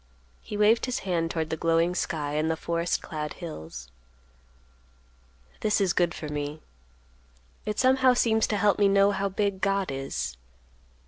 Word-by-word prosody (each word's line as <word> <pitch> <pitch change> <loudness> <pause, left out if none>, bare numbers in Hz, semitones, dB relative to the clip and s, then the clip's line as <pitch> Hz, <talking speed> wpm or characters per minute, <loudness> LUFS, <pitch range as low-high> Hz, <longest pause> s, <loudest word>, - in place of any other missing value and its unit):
He 210 - -6
waved 220 +4 +4
his 250 - -2
hand 170 -3 0
toward 160 -1 -2
the - - 0
glowing 165 +2 +2
sky 155 -5 -2
and 155 +1 0
the 160 - +1
forest 170 +1 -1
clad 150 -2 -5
hills. 80 - -8 1.7
"This 210 0 +1
is 190 -3 +2
good 175 -1 +1
for 155 - -6
me; 150 +1 -4 1.0
it 210 - -2
somehow 260 0 +4
seems 220 -2 +2
to 210 - 0
help 205 0 +2
me 205 - +5
know 200 +1 +4
how 200 0 -1
big 195 0 -1
God 195 -4 +1
is. 135 - -4
180 Hz, 155 wpm, -27 LUFS, 155-205 Hz, 1.7 s, me